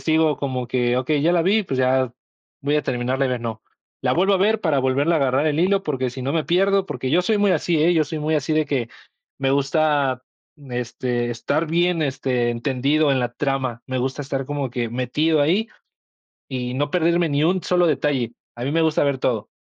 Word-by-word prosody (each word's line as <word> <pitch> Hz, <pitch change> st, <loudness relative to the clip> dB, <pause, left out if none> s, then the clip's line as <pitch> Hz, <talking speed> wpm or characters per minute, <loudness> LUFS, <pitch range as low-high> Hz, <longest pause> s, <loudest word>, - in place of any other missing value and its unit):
sigo 160 Hz, -1 st, +2 dB
como 130 Hz, -3 st, -3 dB
que, 125 Hz, 0 st, 0 dB
okey, 140 Hz, +3 st, 0 dB
ya 170 Hz, +2 st, +3 dB
la 170 Hz, -2 st, +3 dB
vi, 205 Hz, +4 st, +3 dB
pues 135 Hz, -8 st, -4 dB
ya 130 Hz, -1 st, +2 dB, 0.5 s
voy 145 Hz, +1 st, +1 dB
a 150 Hz, -, +1 dB
terminarla 130 Hz, +2 st, -1 dB
de 130 Hz, -, -2 dB
ver, 125 Hz, -, -2 dB
no, 110 Hz, -1 st, -5 dB, 0.4 s
la -, -, +1 dB
vuelvo 190 Hz, +4 st, +3 dB
a 195 Hz, -, +3 dB
ver 215 Hz, +3 st, +2 dB
para 155 Hz, -5 st, +2 dB
volverla 135 Hz, +5 st, +2 dB
a -, -, +2 dB
agarrar 135 Hz, +2 st, +1 dB
el 155 Hz, +1 st, +1 dB
hilo 195 Hz, +2 st, +2 dB
porque 130 Hz, -4 st, -2 dB
si 130 Hz, +1 st, -7 dB
no 135 Hz, +3 st, -2 dB
me 160 Hz, -2 st, 0 dB
pierdo, 195 Hz, +2 st, +2 dB
porque 130 Hz, +1 st, -4 dB
yo 175 Hz, +4 st, +4 dB
soy 215 Hz, +3 st, +1 dB
muy 205 Hz, -1 st, +3 dB
así, 170 Hz, -4 st, +1 dB
¿eh?, 175 Hz, +2 st, +4 dB
yo 160 Hz, -2 st, +3 dB
soy 155 Hz, +2 st, -5 dB
muy 155 Hz, +1 st, -1 dB
así, 155 Hz, +1 st, 0 dB
de 155 Hz, -, +2 dB
que, 135 Hz, -5 st, -2 dB, 0.5 s
me 135 Hz, -1 st, 0 dB
gusta, 140 Hz, -2 st, +1 dB, 0.3 s
mm, 140 Hz, -4 st, -13 dB
este, 120 Hz, 0 st, -2 dB
estar 140 Hz, +7 st, -1 dB
bien, 170 Hz, +1 st, +1 dB
este, 130 Hz, -4 st, -1 dB
entendido 140 Hz, +5 st, +1 dB
en 130 Hz, -, +1 dB
la 120 Hz, 0 st, -2 dB
trama, 130 Hz, -4 st, -2 dB
me 130 Hz, -1 st, -2 dB
gusta 135 Hz, +3 st, -2 dB
estar 135 Hz, -1 st, -3 dB
como 145 Hz, -3 st, -3 dB
que 120 Hz, -2 st, -2 dB
metido 135 Hz, +7 st, 0 dB
ahí 195 Hz, +10 st, +1 dB, 0.8 s
y 125 Hz, -2 st, -3 dB
no 145 Hz, +2 st, -1 dB
perderme 170 Hz, -1 st, +2 dB
ni 145 Hz, 0 st, 0 dB
un 180 Hz, +3 st, +2 dB
solo 180 Hz, -1 st, +2 dB
detalle, 135 Hz, -5 st, 0 dB, 0.2 s
a 120 Hz, -, -8 dB
mí 140 Hz, -, -1 dB
me 165 Hz, +2 st, +1 dB
gusta 160 Hz, -1 st, +2 dB
ver 140 Hz, -2 st, 0 dB
todo. 115 Hz, -5 st, -1 dB
140 Hz, 225 wpm, -22 LUFS, 130-160 Hz, 0.8 s, yo